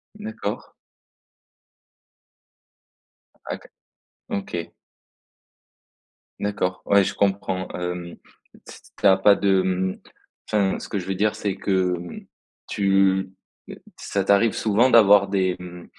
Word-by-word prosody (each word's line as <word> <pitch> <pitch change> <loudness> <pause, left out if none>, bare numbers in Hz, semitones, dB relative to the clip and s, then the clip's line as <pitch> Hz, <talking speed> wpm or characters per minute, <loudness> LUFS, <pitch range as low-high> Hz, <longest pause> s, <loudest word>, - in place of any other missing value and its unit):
D'accord. 210 - -6 2.7
OK, - - -6 0.7
OK. 90 -4 -4 1.7
D'accord, 95 -3 -2
ouais, 100 -1 +4
je - - -2
comprends, 95 -2 -1
hem, 90 -1 -5 0.4
t - - -19
s - - -16
tu - - -5
as 95 - +7
pas 100 +1 +5
de, 95 -2 +2
hem, 95 0 -1 0.5
enfin, 100 -3 +1
ce - - -8
que 100 - -2
je 90 - -6
veux 95 - -2
dire, 105 +2 0
c'est 100 -2 -2
que, 95 -2 0
hem, 85 0 -9 0.4
tu 95 -1 +2 0.7
ça 100 -1 -2
t'arrive 100 +3 +3
souvent 110 +4 +2
d'avoir 100 -3 +6
des, 95 -2 +1
mmh, 90 -1 -10
95 Hz, 115 wpm, -23 LUFS, 95-100 Hz, 2.7 s, as